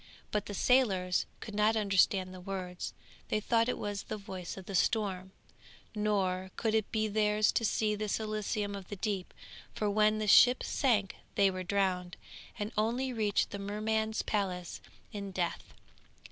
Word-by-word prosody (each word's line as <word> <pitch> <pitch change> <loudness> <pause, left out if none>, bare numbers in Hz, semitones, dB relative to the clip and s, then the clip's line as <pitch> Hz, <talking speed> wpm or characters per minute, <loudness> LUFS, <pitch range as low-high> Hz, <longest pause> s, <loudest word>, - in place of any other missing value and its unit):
But 210 - -1
the 205 - -5
sailors 190 -8 +2
could 220 - -7
not 210 +2 +3
understand 195 -2 +2
the 185 - -9
words, 180 -1 -5 0.3
they 215 - 0
thought 230 +2 +2
it - - -1
was 205 -1 -3
the 215 - -5
voice 190 -3 -7
of 190 - -9
the 200 - -7
storm; 190 -2 0 0.6
nor 195 -3 0
could 220 -2 0
it 220 -2 +1
be 220 -2 +1
theirs 210 0 +2
to - - 0
see 215 -1 +1
this 210 0 -1
Elysium 215 -1 -2
of 195 -2 -7
the 205 - -5
deep, 195 -2 -3 0.4
for 210 -1 0
when 215 +1 +3
the 215 - -1
ship 245 +6 +7
sank 215 -8 +1 0.2
they 195 -1 +4
were 185 0 -4
drowned, 185 -2 -1 0.4
and 205 +1 -3
only 245 +5 0
reached 215 -3 +1
the 200 - -5
Merman's 220 +2 -1
palace 185 -4 -2 0.3
in 200 -1 -5
death. 180 -2 -3
205 Hz, 165 wpm, -32 LUFS, 190-215 Hz, 0.6 s, ship